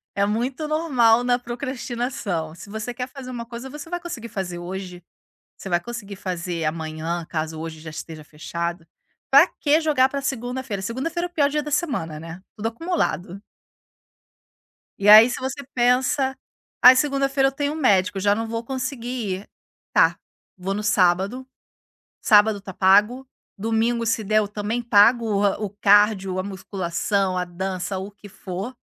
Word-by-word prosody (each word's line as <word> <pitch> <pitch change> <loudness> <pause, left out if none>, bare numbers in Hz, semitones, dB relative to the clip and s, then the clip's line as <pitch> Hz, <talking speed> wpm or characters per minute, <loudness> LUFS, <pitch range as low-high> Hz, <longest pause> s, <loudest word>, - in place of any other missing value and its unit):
é 200 0 +2
muito 250 +8 -2
normal 255 -7 +3
na 245 0 +2
procrastinação. 240 - -4
Se 200 - -12
você 220 +3 -5
quer 250 +1 -4
fazer 260 -1 -10
uma 235 -2 -6
coisa 240 +3 -8
você 295 +3 -9
vai 350 - -3
conseguir 330 -10 -7
fazer 190 -5 -4
hoje, 180 0 -7 0.5
você 195 - -8
vai 175 - +2
conseguir 205 -1 -7
fazer 175 -3 -4
amanhã 160 +2 -3
caso 155 0 -3
hoje 160 -1 -6
já 160 +1 -9
esteja 155 0 -8
fechado. 170 +3 -5 0.5
Pra 280 +6 +8
que 305 -1 +1
jogar 285 -4 +3
para 280 +1 -3
segunda-feira? 245 -5 -3
Segunda-feira 275 - -3
é - - -24
pior 295 -5 +2
dia 300 0 -1
da 300 - -6
semana, 240 - -2
né, 165 +3 -9
tudo 225 0 -3
acumulado. 230 - -2 1.6
E 200 - 0
aí 215 +3 +10
se 250 - -4
você 265 +2 -4
pensa: 260 +2 +2 0.5
"Ai, 250 +1 +10
segunda-feira 275 0 +2
eu 270 - -4
tenho 285 +1 -2
um - - -5
médico, 195 -9 +2
já 205 +1 +3
não 225 +2 -3
vou 230 +1 -4
conseguir 255 -1 -4 0.3
ir", 205 - -17 0.4
tá, - - +4 0.4
vou 190 +1 -3
no 210 - -3
sábado, 200 +5 +2 0.7
sábado 210 -1 +4
tá 195 -1 -9
pago, 210 +8 +3 0.3
domingo 225 +3 0
se 225 -1 0
der 215 +2 +3
eu 210 - 0
também 210 +3 -3
pago 230 +1 +5
o 205 0 +1
o 195 - -8
cardio, 200 -2 +4
a - - 0
musculação, 190 0 -2
a 180 - 0
dança, 185 +2 -4
o 190 +2 -6
que 205 0 -15
for, 190 +5 -6
215 Hz, 165 wpm, -23 LUFS, 190-255 Hz, 1.6 s, aí